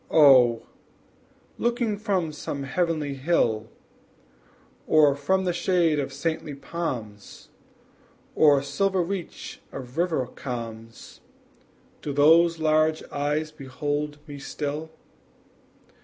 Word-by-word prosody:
Oh, 130 -6 +6 1.0
looking 235 -2 0
from 190 -7 -1
some 140 -1 -5
heavenly 155 0 -1
hill, 130 -7 0 1.2
Or 150 -2 +5
from 190 +7 0
the 180 - +1
shade 170 -4 +2
of 135 -1 -3
saintly 150 +1 -3
palms, 125 -10 -6 0.8
Or 145 -3 +5
silver 190 +5 0
reach 185 -1 -6
of 130 +3 -7
river 165 -7 +1
calms, 115 -3 -8 0.8
Do 145 - -4
those 165 +4 +5
large 155 0 +2
eyes 150 +2 -1
behold 145 +2 -4
me 145 -2 -9
still? 150 +3 -4
150 Hz, 95 wpm, -25 LUFS, 135-170 Hz, 1.2 s, Oh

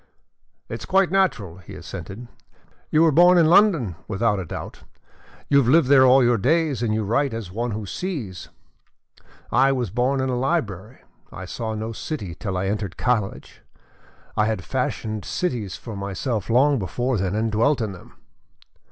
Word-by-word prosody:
"It - - -6
is - - -8
quite 190 -1 +3
natural," 120 - 0
he 95 - -12
assented. 100 +8 -8 0.6
"You 155 +1 +4
were 165 - +5
born 175 +4 +6
in 170 - +5
London, 165 - +4
without 105 0 0
a 95 - -5
doubt, - - -7 0.7
you 140 - +5
have 130 - +1
lived 140 0 +4
there 130 -2 +7
all 130 +1 +6
your 120 -1 +3
days 150 - +1
and 115 -3 0
you 110 0 0
write 120 +4 0
as 110 -6 -6
one 120 +5 -2
who 110 -1 -4
sees. 115 - -5 1.0
I 135 +1 +4
was 125 -7 -2
born 125 +5 0
in 130 - 0
a 125 - 0
library. 120 - -3 0.3
I 95 - -8
saw 110 +3 -4
no 110 +1 -4
city 110 - -5
till 95 +1 -4
I 90 - -1
entered 100 -2 -3
college. 110 -6 -2 0.7
I 105 - +2
had 110 -4 -2
fashioned 110 -5 -3
cities 115 - -3
for 115 -3 -8
myself 100 +3 -3
long 135 +3 +3
before 110 +6 -2
then, 95 +1 -1
and 110 +1 0
dwelt 115 +6 +2
in 110 -3 -2
them." 90 -2 -13
115 Hz, 175 wpm, -23 LUFS, 100-135 Hz, 1.0 s, there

